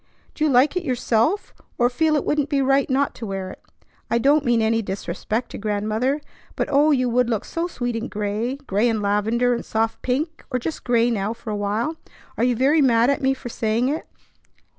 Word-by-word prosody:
Do 305 Hz, -, -3 dB
you 310 Hz, -, +3 dB
like 265 Hz, +5 st, +4 dB
it 360 Hz, -, -1 dB
yourself, 250 Hz, -, 0 dB, 0.2 s
or 240 Hz, -, +4 dB
feel 305 Hz, +5 st, +1 dB
it 295 Hz, -, 0 dB
wouldn't 295 Hz, -1 st, 0 dB
be 280 Hz, -, +1 dB
right 270 Hz, +1 st, +2 dB
not 275 Hz, +1 st, +1 dB
to 230 Hz, -, -7 dB
wear 190 Hz, -1 st, -4 dB
it? -, -, -13 dB, 0.5 s
I 235 Hz, -, +2 dB
don't 285 Hz, +5 st, +3 dB
mean 240 Hz, -3 st, +2 dB
any 225 Hz, +1 st, +2 dB
disrespect 200 Hz, +4 st, -4 dB
to -, -, -7 dB
Grandmother; 215 Hz, +7 st, -1 dB, 0.3 s
but -, -, -2 dB
oh, 290 Hz, +2 st, +4 dB
you 255 Hz, -4 st, +2 dB
would 245 Hz, 0 st, +2 dB
look 225 Hz, -4 st, -1 dB
so 335 Hz, +1 st, -2 dB
sweet 245 Hz, -7 st, -3 dB
in 230 Hz, +1 st, -3 dB
gray, 210 Hz, +5 st, -2 dB
gray 240 Hz, -5 st, 0 dB
and 220 Hz, -2 st, -1 dB
lavender 220 Hz, +5 st, +1 dB
and 235 Hz, -, -3 dB
soft 225 Hz, 0 st, -1 dB
pink, 305 Hz, +6 st, -2 dB
or 255 Hz, -, 0 dB
just 300 Hz, +6 st, -5 dB
gray 240 Hz, -1 st, +3 dB
now 210 Hz, -1 st, -1 dB
for 230 Hz, -1 st, -8 dB
a -, -, -1 dB
while. 210 Hz, +10 st, -1 dB, 0.4 s
Are -, -, -1 dB
you 245 Hz, 0 st, +3 dB
very 280 Hz, +6 st, +3 dB
mad 240 Hz, -1 st, +4 dB
at 280 Hz, -, -1 dB
me 270 Hz, 0 st, +2 dB
for 260 Hz, -2 st, -8 dB
saying 230 Hz, +2 st, 0 dB
it?" 305 Hz, +3 st, -3 dB
245 Hz, 215 wpm, -22 LUFS, 220-275 Hz, 0.5 s, like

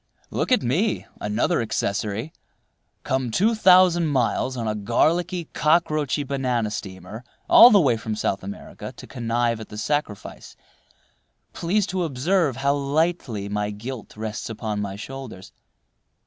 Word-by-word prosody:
Look -, -, -2 dB
at 255 Hz, -, +4 dB
me, 180 Hz, -, 0 dB
another 105 Hz, +2 st, 0 dB
accessory, 110 Hz, +4 st, -2 dB, 0.7 s
come 130 Hz, -2 st, -1 dB
two 205 Hz, -, +2 dB
thousand 180 Hz, -5 st, +5 dB
miles 130 Hz, -1 st, 0 dB
on 115 Hz, -2 st, -3 dB
a 110 Hz, -, 0 dB
garlicky, 165 Hz, -, 0 dB
cockroachy 155 Hz, -3 st, +1 dB
banana 125 Hz, -5 st, -1 dB
steamer 95 Hz, +2 st, -7 dB, 0.2 s
all 240 Hz, -, +9 dB
the 205 Hz, -, +6 dB
way 130 Hz, -9 st, +3 dB
from 110 Hz, -1 st, -4 dB
South 100 Hz, -2 st, -1 dB
America 100 Hz, +1 st, -8 dB
to -, -, -10 dB
connive 115 Hz, -1 st, -1 dB
at 110 Hz, -, -9 dB
the 105 Hz, -, -9 dB
sacrifice—please 150 Hz, -, -5 dB
to 185 Hz, -2 st, -2 dB
observe 155 Hz, 0 st, +1 dB
how 140 Hz, +1 st, +1 dB
lightly 140 Hz, -, -1 dB
my 105 Hz, 0 st, -2 dB
guilt 110 Hz, +2 st, -8 dB
rests 110 Hz, 0 st, -5 dB
upon 110 Hz, -2 st, -3 dB
my 100 Hz, -1 st, -4 dB
shoulders. 120 Hz, -3 st, -9 dB
125 Hz, 135 wpm, -23 LUFS, 110-160 Hz, 0.7 s, all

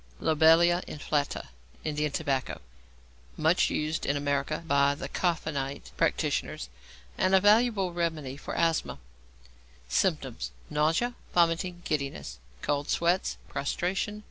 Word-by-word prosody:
=Lobelia 165 Hz, +3 st, +5 dB
Inflata= 145 Hz, -, -2 dB, 0.3 s
(Indian 150 Hz, -1 st, -1 dB
Tobacco). 140 Hz, -3 st, -1 dB, 0.8 s
Much -, -, +3 dB
used 155 Hz, +1 st, -1 dB
in 140 Hz, -, 0 dB
America 145 Hz, +2 st, -1 dB
by 140 Hz, -2 st, +3 dB
the -, -, -5 dB
Coffenite 145 Hz, -6 st, -2 dB
practitioners, 60 Hz, -, 0 dB, 0.5 s
and 185 Hz, +1 st, +4 dB
a -, -, +7 dB
valuable 205 Hz, -2 st, +3 dB
remedy 160 Hz, -6 st, -2 dB
for 145 Hz, -, -6 dB
asthma. 165 Hz, -1 st, +1 dB, 0.9 s
Symptoms. -, -, 0 dB, 0.2 s
Nausea, 160 Hz, +11 st, +1 dB, 0.2 s
vomiting, 175 Hz, +1 st, +2 dB
giddiness, 140 Hz, -, -3 dB, 0.2 s
cold 145 Hz, 0 st, -1 dB
sweats, 175 Hz, +2 st, +1 dB
prostration. 190 Hz, +8 st, -2 dB
155 Hz, 105 wpm, -28 LUFS, 140-175 Hz, 0.9 s, a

